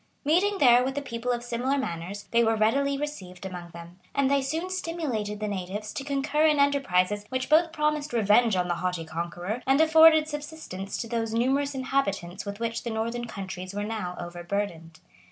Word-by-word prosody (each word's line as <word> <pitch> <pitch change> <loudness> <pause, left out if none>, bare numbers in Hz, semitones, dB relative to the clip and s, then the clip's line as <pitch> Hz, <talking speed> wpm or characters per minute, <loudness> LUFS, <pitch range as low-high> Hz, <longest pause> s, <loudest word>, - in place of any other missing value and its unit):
Meeting 375 +7 +3
there 250 -5 +6
with 265 +2 -3
a - - 0
people 235 -1 -3
of 240 -1 -2
similar 245 +3 -1
manners, 190 -3 -4
they 235 0 +4
were 225 0 +3
readily 275 +6 +2
received 195 -12 -6
among 180 -2 -7
them; 170 +2 -12 0.2
and 275 -1 +2
they 280 0 +3
soon 320 +7 -2
stimulated 305 - -3
the 215 - -2
natives 200 +2 -4
to 275 - -4
concur 290 +2 +1
in 300 -1 +3
enterprises 205 -9 +2
which 260 0 -2
both 325 +2 +5
promised 300 -1 0
revenge 220 0 +4
on 180 -1 0
the 175 - +1
haughty 180 -2 -2
conqueror, 175 +7 -4
and 270 +2 +4
afforded 320 -1 +7
subsistence 295 -11 -6
to 230 - -4
those 225 -1 -2
numerous 275 +4 +1
inhabitants 205 -9 -2
with 200 +1 -5
which 230 0 -2
the 235 - -4
northern 230 +2 -2
countries 190 -2 -7
were 205 - -2
now 210 -5 -4
overburdened. 175 -1 -4
230 Hz, 185 wpm, -27 LUFS, 190-280 Hz, 0.2 s, afforded